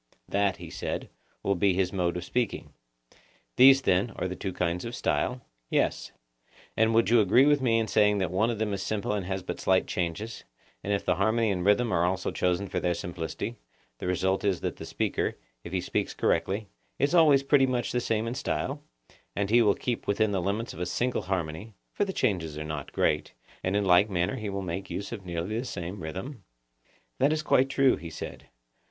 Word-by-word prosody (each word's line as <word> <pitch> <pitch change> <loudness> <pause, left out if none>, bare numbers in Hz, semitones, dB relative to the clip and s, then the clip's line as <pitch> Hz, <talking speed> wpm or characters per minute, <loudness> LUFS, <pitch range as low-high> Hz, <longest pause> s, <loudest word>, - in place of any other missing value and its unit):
That, 100 -1 +1
he - - -9
said, - - -4 0.3
will 100 - +2
be 95 0 +2
his 95 0 0
mode 90 -2 0
of 90 - -4
speaking. 120 +4 -2 0.8
These, 135 +1 +7
then, 95 +5 +2
are - - -2
the 90 - -5
two 95 - -4
kinds 90 0 -1
of 120 +1 -5
style? 125 -1 -1 0.3
Yes. - - 0 0.6
And 110 0 +3
you - - 0
would 115 0 +3
agree 115 +3 +5
with 145 -1 +4
me 115 -3 +3
in 110 -1 0
saying 105 0 +3
that 95 -4 -1
one 105 +5 +2
of 115 - -2
them 105 -1 -1
is 100 - -3
simple 105 0 -2
and 100 -4 -2
has 95 -1 -3
but - - -5
slight 95 0 +2
changes; 95 +5 -3 0.4
and 100 - -2
if 100 - 0
the 90 -1 +1
harmony 110 +2 +2
and 90 -2 -1
rhythm 105 +4 +3
are 85 -2 +2
also 95 +2 0
chosen 90 +2 0
for 90 - -2
their 90 -1 0
simplicity, 85 +7 -5 0.4
the - - -4
result 95 +1 0
is 100 -4 +1
that - - -3
the - - -7
speaker, - - -1 0.3
if 85 - -8
he 95 - 0
speaks - - -2
correctly, 100 +3 0 0.3
is 140 +4 +1
always 150 -5 +6
pretty 140 -1 +4
much 125 -2 -1
the 125 - 0
same 110 -1 0
in 115 - -2
style, - - -2 0.5
and 100 0 -1
he 120 +1 +6
will 105 -3 +4
keep 120 -2 -3
within 105 +1 +2
the 95 -2 0
limits 105 +6 -2
of - - -10
a 90 - -2
single 125 +7 0
harmony 90 +3 -4 0.2
(for 205 - +1
the 195 - -3
changes 90 - -1
are 75 - -4
not 75 -2 -5
great), - - 0 0.3
and 95 +2 0
in 105 -1 +1
like 95 +3 +5
manner 90 +7 0
he 110 -3 -4
will 100 0 -3
make 95 +2 -4
use 100 - -5
of 110 -5 -6
nearly 85 +6 -2
the - - -3
same 90 -5 -5
rhythm? 95 - -6 0.8
That 140 +3 +4
is 155 0 0
quite 135 -2 +3
true, 135 -1 +3
he 85 - -8
said. - - -8
100 Hz, 215 wpm, -28 LUFS, 90-115 Hz, 0.8 s, These